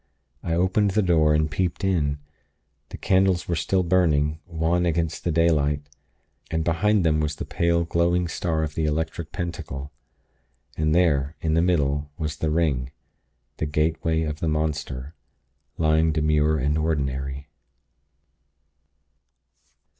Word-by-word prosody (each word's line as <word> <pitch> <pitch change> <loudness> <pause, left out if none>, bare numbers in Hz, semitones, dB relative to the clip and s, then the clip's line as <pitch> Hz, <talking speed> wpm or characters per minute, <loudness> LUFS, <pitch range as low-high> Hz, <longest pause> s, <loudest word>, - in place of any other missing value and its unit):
I 85 - -2
opened 95 +4 +2
the 105 - +4
door, 80 -4 +3
and 75 0 +2
peeped 90 +4 -2
in. 80 -7 +1 0.7
The - - -8
candles 95 -2 +2
were 85 - 0
still 90 +4 +1
burning, 80 -4 +2
wan 85 +1 0
against 80 -1 -1
the 85 - 0
daylight; 75 -3 +2 0.7
and 80 -1 -1
behind 85 +4 +2
them 75 -1 +3
was 75 -1 -1
the - - -5
pale, 85 0 +1
glowing 85 +1 +1
star 80 -1 -1
of 75 -1 -3
the 80 0 -1
Electric 80 +1 -2
Pentacle. 75 -5 -5 0.8
And 75 0 +1
there, 75 -4 +2
in 80 -1 -1
the 80 - +3
middle, 75 -5 +1
was 75 0 -3
the 80 - -1
ring... 75 -6 0 0.7
the 75 - -2
gateway 80 +2 0
of 75 -1 -4
the 80 - -2
monster, 75 -3 -3 0.6
lying 80 0 +3
demure 75 0 +2
and 75 +2 0
ordinary. 70 -2 -2
80 Hz, 135 wpm, -24 LUFS, 75-85 Hz, 0.8 s, the